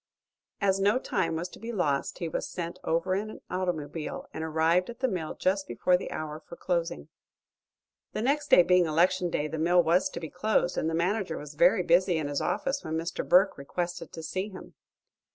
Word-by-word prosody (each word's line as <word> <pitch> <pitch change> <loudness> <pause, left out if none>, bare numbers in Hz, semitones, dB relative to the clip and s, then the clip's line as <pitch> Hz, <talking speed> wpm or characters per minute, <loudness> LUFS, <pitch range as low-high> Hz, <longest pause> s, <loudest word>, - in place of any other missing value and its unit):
As 195 -1 +2
no 205 +4 +3
time 185 -9 -1
was 170 +2 -2
to - - -13
be 230 +2 -5
lost 150 -10 -1
he 170 - -3
was 160 - -3
sent 175 +1 -5
over 170 +3 0
in 205 +3 -1
an - - -10
automobile, 165 -4 -3
and 160 - -4
arrived 160 +4 +2
at 235 +1 -8
the 260 - +2
mill 180 -8 -3
just 190 +1 0
before 150 +9 +2
the 180 - -3
hour 155 0 -5
for 170 - -12
closing. 170 - -2 1.0
The 215 - -2
next 290 +3 +1
day 180 - +8
being 180 -1 +4
election 175 +3 +2
day 150 -2 -1
the 160 +1 -5
mill 175 +2 +4
was 180 +4 +3
to - - -6
be 160 -2 -7
closed, 180 -1 +1
and 160 - 0
the 165 - -1
manager 190 +4 0
was 150 0 -8
very 180 +6 +4
busy 175 +1 +3
in 155 -2 -2
his 145 - -1
office 275 +1 -1
when 160 - -3
Mr. 165 +1 -3
Burke 185 -2 +5
requested 175 +4 -4
to 160 - -7
see 185 +5 -3
him. 190 - -11
175 Hz, 205 wpm, -28 LUFS, 160-190 Hz, 1.0 s, day